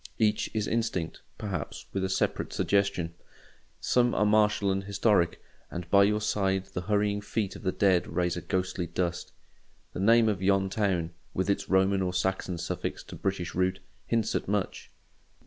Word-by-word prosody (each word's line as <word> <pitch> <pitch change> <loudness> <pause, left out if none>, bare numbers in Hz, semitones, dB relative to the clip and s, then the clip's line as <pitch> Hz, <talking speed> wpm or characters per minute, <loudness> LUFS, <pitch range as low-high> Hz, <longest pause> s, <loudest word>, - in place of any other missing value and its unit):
Each 105 -1 +2
is 105 -1 0
instinct, 110 -8 -1 0.2
perhaps, 95 -7 -5
with 95 - -1
a 95 - 0
separate 95 - 0
suggestion. 100 -5 +1 0.7
Some 120 -1 +2
are 105 - +3
martial 105 -1 +3
and 95 0 -1
historic, 100 -3 +2 0.3
and 85 +1 -6
by 100 0 +7
your 105 +1 +1
side 95 -2 0
the 90 - -2
hurrying 105 +1 +1
feet 105 -1 -2
of - - -9
the 95 - 0
dead 95 -3 +3
raise 90 +2 0
a 90 - -4
ghostly 90 +1 -2
dust. 85 +1 -2 0.6
The - - -5
name 115 +3 +5
of 100 -4 0
yon 95 0 +2
town—with 95 -2 -1
its - - -2
Roman 95 +1 +3
or 90 -1 -1
Saxon 95 -1 -1
suffix 85 - -4
to - - -10
British 95 -3 -2
root—hints 95 +4 -1
at - - -1
much. 100 -1 -2
95 Hz, 165 wpm, -28 LUFS, 90-105 Hz, 0.7 s, by